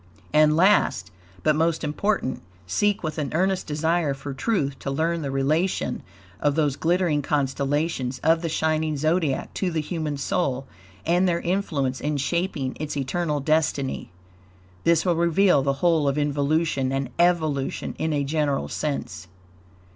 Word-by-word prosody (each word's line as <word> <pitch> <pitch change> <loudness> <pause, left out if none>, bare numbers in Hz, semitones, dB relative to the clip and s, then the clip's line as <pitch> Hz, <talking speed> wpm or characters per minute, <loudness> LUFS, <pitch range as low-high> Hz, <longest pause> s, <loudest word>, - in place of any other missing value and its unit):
And 155 0 +5
last, 140 - +3 0.3
but 155 -1 +3
most 165 +1 +1
important, 155 0 -1 0.2
seek 205 - +1
with 155 0 -3
an 145 -3 -2
earnest 190 +2 +1
desire 160 -1 0
for 135 +1 -6
truth 140 - -1
to - - -4
learn 165 +4 0
the 140 - -3
relation 140 +2 0 0.4
of 145 +2 +1
those 150 -4 +1
glittering 170 -2 +1
constellations 140 -1 -1
of 165 0 +4
the 165 - -2
shining 155 -1 0
Zodiac 155 -1 0
to 190 - -1
the 165 -2 -1
human 155 -2 -3
soul 135 -2 -1 0.4
and 175 +3 +3
their 170 -1 0
influence 155 -8 -1
in 150 0 -1
shaping 145 -2 -1
its 150 -1 -4
eternal 150 +2 -1
destiny. 150 -2 0 0.8
This 165 0 +3
will 175 -2 +2
reveal 170 -1 +3
the 140 0 +1
whole 160 -4 +3
of 140 +1 +1
involution 145 -1 +1
and 135 -2 -2
evolution 160 -6 +1
in 160 0 0
a 145 -1 0
general 145 -1 0
sense. 145 -10 -4
155 Hz, 145 wpm, -24 LUFS, 140-170 Hz, 0.8 s, And